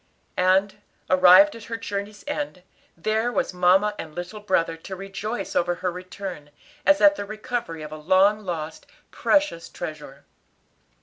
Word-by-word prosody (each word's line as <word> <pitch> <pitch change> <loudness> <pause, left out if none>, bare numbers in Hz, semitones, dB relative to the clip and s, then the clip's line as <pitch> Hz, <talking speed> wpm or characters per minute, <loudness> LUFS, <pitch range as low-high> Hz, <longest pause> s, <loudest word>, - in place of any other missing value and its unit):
And, 190 +2 +2 0.3
arrived 185 +11 +7
at 230 - -10
her 230 - -4
journey's 205 -1 -5
end, 290 -10 -4 0.3
there 220 +7 0
were - - +1
mamma 185 +4 +3
and 155 -2 -7
little 180 +5 -6
brother 185 -5 0
to 190 +4 -8
rejoice 195 +1 -5
over 175 0 +1
her 180 0 -2
return, 180 -3 -8 0.4
as 295 0 +5
at 300 0 +6
the - - -3
recovery 215 -6 -5
of 150 - -8
a 155 - -6
long 190 +6 +3
lost, 160 -6 -6 0.2
precious 295 - +1
treasure. 150 -3 -8
190 Hz, 145 wpm, -24 LUFS, 175-215 Hz, 0.4 s, arrived